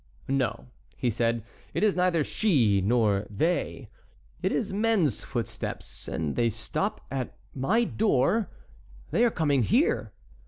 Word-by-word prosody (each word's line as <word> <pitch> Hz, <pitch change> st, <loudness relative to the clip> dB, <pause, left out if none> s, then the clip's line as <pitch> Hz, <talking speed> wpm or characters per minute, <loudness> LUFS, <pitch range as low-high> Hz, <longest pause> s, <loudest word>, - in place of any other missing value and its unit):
"No," 135 Hz, -2 st, 0 dB, 0.3 s
he 125 Hz, -, +1 dB
said, 115 Hz, 0 st, 0 dB, 0.3 s
"it -, -, +1 dB
is 210 Hz, -2 st, +3 dB
neither 180 Hz, -3 st, +2 dB
she 125 Hz, -, +2 dB
nor 105 Hz, -2 st, +2 dB
they; 160 Hz, -, -1 dB, 0.5 s
it -, -, +1 dB
is 205 Hz, -4 st, -1 dB
men's 205 Hz, -, +1 dB
footsteps, -, -, -5 dB
and 80 Hz, -3 st, -2 dB
they 115 Hz, -1 st, +2 dB
stop 115 Hz, +1 st, -3 dB
at 130 Hz, -2 st, -4 dB, 0.2 s
my 140 Hz, -, +2 dB
door—they 130 Hz, -, -1 dB
are 240 Hz, -, +5 dB
coming 145 Hz, -, +1 dB
here." 240 Hz, -, +2 dB
135 Hz, 125 wpm, -27 LUFS, -, 0.5 s, are